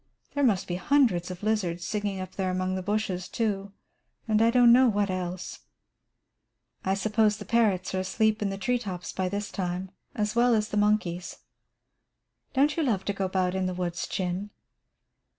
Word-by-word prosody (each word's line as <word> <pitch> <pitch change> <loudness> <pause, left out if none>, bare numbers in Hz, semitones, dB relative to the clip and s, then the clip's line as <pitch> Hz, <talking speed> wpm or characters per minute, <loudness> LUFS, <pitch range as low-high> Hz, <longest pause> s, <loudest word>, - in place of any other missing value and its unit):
There 285 - 0
must 210 -8 +2
be 175 - -2
hundreds 190 -6 +2
of 180 +2 -8
lizards 180 -6 0
singing 205 -1 -2
up 185 -1 -6
there 190 -1 -2
among 185 0 -1
the 185 - -2
bushes, 190 -2 -2
too, 200 -3 -2 0.6
and 215 -1 +3
I 230 - +5
don't 240 0 +6
know 255 0 +6
what 205 -2 +1
else." 180 0 -4 1.2
"I 190 +1 +1
suppose 215 +1 +2
the 205 - -8
parrots 210 -7 +1
are 190 - 0
asleep 215 +3 +1
in 205 - 0
the 195 - -4
tree 245 +5 0
tops 185 -6 -5
by 185 -1 -1
this 205 +2 -4
time, 180 0 -3 0.2
as 210 0 -1
well 240 0 +4
as 215 -1 0
the - - -4
monkeys. 205 -4 0 1.2
Don't 290 +2 +3
you - - +2
love 220 -10 0
to 200 - 0
go 195 -1 -2
about 185 -1 0
in 190 -1 0
the 185 - -3
woods, 175 -1 -3
Chin?" 185 +2 -3
200 Hz, 185 wpm, -27 LUFS, 185-220 Hz, 1.2 s, don't